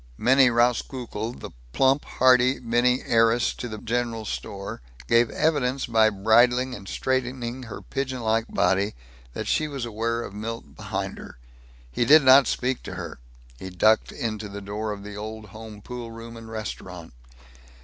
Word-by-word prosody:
Minnie 130 +3 +5
Rauskukle, 120 -1 -1 0.2
plump, 135 - +3
hearty 130 +1 +4
Minnie, 120 +1 +1
heiress 115 0 +3
to 120 - -6
the 110 -2 -6
general 115 0 -2
store, 100 -7 -6 0.3
gave 115 0 +4
evidence 140 -4 0
by 110 -2 +4
bridling 120 +5 +3
and 100 -4 -9
straightening 130 0 -2
her 115 -4 -8
pigeon 130 -2 -3
like 110 0 +1
body 100 +2 +1 0.4
that - - -5
she 155 - +1
was 140 -4 -4
aware 115 +1 -2
of 100 - -8
Milt 115 +2 -6
behind - - -4
her. - - -11 0.5
He 120 - 0
did 150 +5 +7
not 130 +1 +7
speak 130 0 -1
to - - -8
her. - - -7 0.4
He 95 - -7
ducked 110 +5 +3
into 110 -2 -4
the 100 +1 -7
door 105 +2 -4
of 100 -1 -7
the 105 0 -8
Old 110 0 -7
Home 110 0 -11
Poolroom 115 -1 -8
and 115 -1 -10
Restaurant. 90 - -7
115 Hz, 155 wpm, -25 LUFS, 110-125 Hz, 0.5 s, did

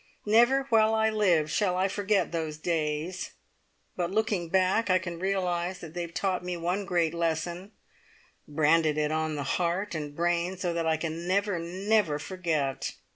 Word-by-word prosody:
Never 240 +6 +4
while 220 -1 +4
I 220 0 +2
live 180 -8 +2
shall 185 -4 +1
I 190 +1 +2
forget 205 +1 0
those 160 -2 -3
days; 160 +2 -2 0.6
but 175 -2 -1
looking 205 -4 0
back, 190 +4 +2
I 185 - +5
can 175 -2 -5
realise 180 -1 -1
that 165 -3 -10
they 175 - -3
have 170 -1 -7
taught 190 -2 -1
me 180 -1 -3
one 180 +4 -1
great 170 -4 +1
lesson, 170 +3 -2 0.8
branded 155 +1 +2
it 150 0 +1
on 155 -1 -1
heart 175 +7 -1
and 150 -2 -5
brain 175 +2 0
so 175 -2 -2
that 165 -1 -1
I 160 0 +2
can 165 +2 -4
never, 200 -1 +1
never 185 -1 +1
forget. 155 -5 -2
175 Hz, 165 wpm, -28 LUFS, 160-195 Hz, 0.8 s, I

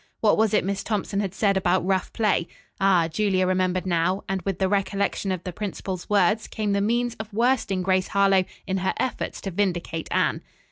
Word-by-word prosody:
What 215 - +4
was 220 -1 +2
it - - +2
Miss 200 0 -2
Thompson 205 -2 -2
had 195 -2 -2
said 200 -2 +2
about 180 -1 +1
rough 190 -1 0
play? 205 -6 +1 0.3
Ah, 185 -4 +4
Julia 185 +2 +1
remembered 185 0 0
now, 185 +2 +1
and 195 -1 -2
with 190 0 -2
the 190 - +1
recollection 200 0 0
of 180 -2 -3
the 180 - -5
principal's 190 -2 -5
words 210 +2 +2
came 210 -2 -2
the 200 0 +1
means 235 +3 +1
of 220 0 -7
worsting 220 -4 +1
Grace 185 0 +1
Harlowe 195 -1 +3 0.2
in 190 -1 -1
her 190 0 -1
efforts 260 - -2
to 195 - -4
vindicate 175 -3 -2
Anne. - - +1
195 Hz, 195 wpm, -24 LUFS, 185-205 Hz, 0.3 s, What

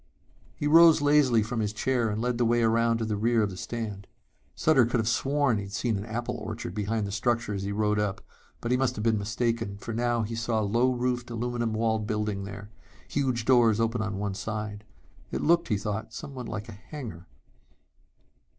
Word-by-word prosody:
He - - -4
rose 165 +1 +7
lazily 145 -6 +4
from 115 +2 -3
his 105 -2 0
chair 120 +1 0
and 105 +1 -2
led 120 +1 -1
the - - +3
way 120 0 +3
around 115 +1 +3
to 115 - -2
the 110 -1 -1
rear 115 +2 +2
of 100 - -1
the - - -7
stand. 105 -1 -5 0.5
Sutter 155 -5 +4
could 120 0 0
have 110 - -1
sworn 135 +1 +2
he 100 - -4
had 100 - -10
seen 115 0 0
an 100 +2 -4
apple 120 +2 -3
orchard 110 -4 -6
behind 105 +1 -1
the 100 - -5
structure 115 0 0
as 100 - -3
he 100 +1 -3
rode 105 0 +1
up, 105 -1 -1 0.4
but 120 - -2
he 125 - +4
must 130 -1 0
have 105 - -4
been 110 -2 +2
mistaken 115 -1 -1
for 115 +3 -6
now 120 0 +1
he 110 +2 -4
saw 115 0 0
a - - 0
low 120 +5 +2
roofed, 125 -1 -1
aluminum 120 -1 -2
walled 110 -1 0
building 105 -2 -2
there, 100 +1 -9 0.4
huge 130 -5 -1
doors 115 -4 +5
open 115 0 0
on 100 -3 -3
one 100 0 -2
side. 105 +1 -5 0.4
It - - -3
looked, 170 +1 +3
he 105 - +1
thought, 105 +1 -4
somewhat 135 -5 -7
like 110 0 -5
a - - -8
hangar.... 110 - -9
115 Hz, 210 wpm, -27 LUFS, 105-120 Hz, 0.5 s, rose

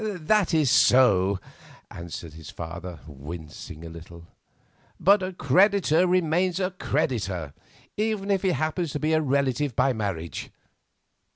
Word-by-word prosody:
"That 205 -1 +1
is 155 -6 +3
so," 100 -8 +4 0.5
answered 85 -2 -8
his 80 -1 -11
father, 85 0 -8
wincing 75 +2 -9
a - - -7
little; 85 +1 -12 0.7
"but 200 +3 +5
a 185 0 -3
creditor 180 +2 +3
remains 180 +1 +1
a 185 0 -1
creditor, 105 - -2 0.4
even 210 -2 -1
if 195 -2 +2
he 190 - +1
happens 155 0 -2
to 150 - -2
be 155 +2 0
a 155 - +3
relative 140 -2 0
by 135 - +2
marriage. 95 -7 -4
140 Hz, 130 wpm, -25 LUFS, -, 0.7 s, but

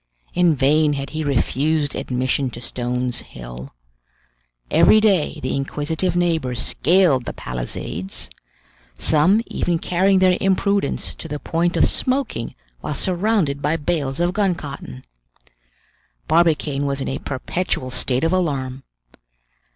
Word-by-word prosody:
In 175 -3 +3
vain 150 +3 +3
had 140 -1 -4
he 155 0 -3
refused 145 +2 +1
admission 130 +1 -1
to 120 - -9
Stones 125 0 -3
Hill; - - -10 1.0
every 170 +7 +6
day 200 -7 +2
the 130 - -1
inquisitive 155 +6 -2
neighbors 160 -9 0
scaled 155 -1 +3
the - - -4
palisades, 60 +9 -4 0.7
some 160 - +3
even 175 -1 -1
carrying 185 +3 +2
their 185 -1 +4
imprudence 195 -3 0
to - - -9
the 150 - -4
point 170 +3 0
of - - +5
smoking 255 - -1 0.2
while 150 - -4
surrounded 180 -5 0
by 150 +3 +1
bales 145 -3 -2
of 175 +1 +1
gun 195 -3 +1
cotton. 140 - -8 1.2
Barbicane 155 -4 +2
was 140 0 -1
in 135 - -3
a 135 - -2
perpetual 130 -1 -3
state 125 +2 0
of 165 +2 +2
alarm. 135 -7 -1
150 Hz, 130 wpm, -21 LUFS, 130-175 Hz, 1.2 s, every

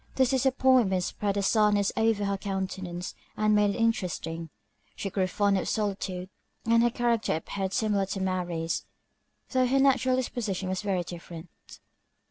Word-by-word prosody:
This 260 -1 +3
disappointment 260 -7 +3
spread 200 +2 -2
a 200 - 0
sadness 205 -1 +3
over 220 -2 +2
her 200 0 0
countenance, 190 -2 -4 0.2
and 215 0 +3
made 210 -1 +4
it - - -5
interesting. 170 -7 -1 0.5
She 195 - -4
grew 190 -1 +1
fond 200 +1 +2
of - - -3
solitude, 195 -3 -2 0.3
and 230 +1 +4
her 240 - +4
character 235 -5 0
appeared 190 +4 -3
similar 205 -2 +1
to 195 - -3
Mary's, 175 -3 -2 0.7
though 255 -1 +3
her 270 +2 +2
natural 260 -2 +3
disposition 215 -7 -2
was 185 +1 -2
very 195 -4 0
different. 170 -1 -9
200 Hz, 150 wpm, -28 LUFS, 185-230 Hz, 0.7 s, made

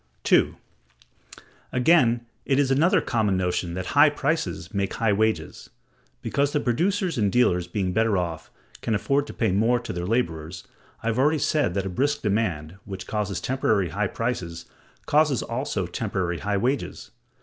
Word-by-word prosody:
2. - - +3 1.2
Again, 125 -3 +3 0.2
it 135 - +1
is 140 -2 +2
another 155 +7 +4
common 105 -6 0
notion 90 -1 -1
that 95 0 -4
high 145 +1 +7
prices 145 - -2
make 100 -1 -1
high 110 -3 +2
wages; 105 -6 -1 0.5
because 140 0 0
the 150 - +2
producers 175 - 0
and 100 -2 +2
dealers, 90 -8 +2
being 90 0 -2
better 110 0 +2
off, 85 -3 -3 0.3
can 110 - 0
afford 140 +7 0
to - - -6
pay 110 -5 +1
more 115 +6 +2
to 120 - -6
their 90 0 -4
laborers. 90 -6 -2 0.4
I - - -3
have 115 +2 -1
already 150 +4 +3
said 145 - +1
that 100 -1 -1
a - - -2
brisk 145 +10 -1
demand, 95 -6 -1
which 95 -2 -7
causes 105 -3 -2
temporary 110 -8 0
high 100 +5 -1
prices, 95 -8 -4 0.4
causes 150 -3 +2
also 115 -5 -2
temporary 90 -3 -2
high 100 +3 -1
wages. 120 -1 -2
110 Hz, 160 wpm, -25 LUFS, 95-135 Hz, 1.2 s, high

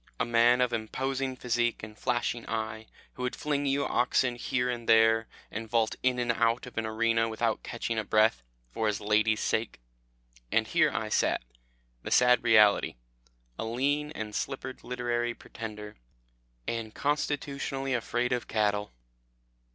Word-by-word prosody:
A - - +2
man 120 +1 +4
of 125 -1 +1
imposing 130 +4 -2
physique 120 -2 -1
and 110 0 -8
flashing 120 0 -1
eye, 110 0 -3 0.3
who - - -9
would 125 0 -2
fling 145 -1 -1
you 140 +1 +1
oxen 125 0 +2
here 125 +1 -1
and 120 -2 -4
there, 115 0 +5 0.2
and 110 +1 -5
vault 115 -1 +1
in 130 -1 +2
and 120 -1 +1
out 115 +1 +1
of 125 - -11
an 110 - -2
arena 115 +1 +1
without 110 0 -1
catching 115 -1 -3
a - - -1
breath, 110 - +3 0.3
for 110 - -1
his 105 -1 0
lady's 110 +1 +2
sake 110 - -1 0.7
and - - +3
here - - +3
I - - -3
sat, - - +1 0.6
the - - -6
sad 125 -1 +5
reality, 110 -3 +5 0.6
a - - -1
lean 140 +6 0
and 110 -1 -5
slippered 130 +2 -4
literary 120 -1 -2
pretender, 105 -2 -8 0.7
and 115 -2 -3
constitutionally 140 -2 -1
afraid 120 0 -1
of 125 - -2
cattle. 105 -1 0
120 Hz, 150 wpm, -29 LUFS, 110-125 Hz, 0.7 s, there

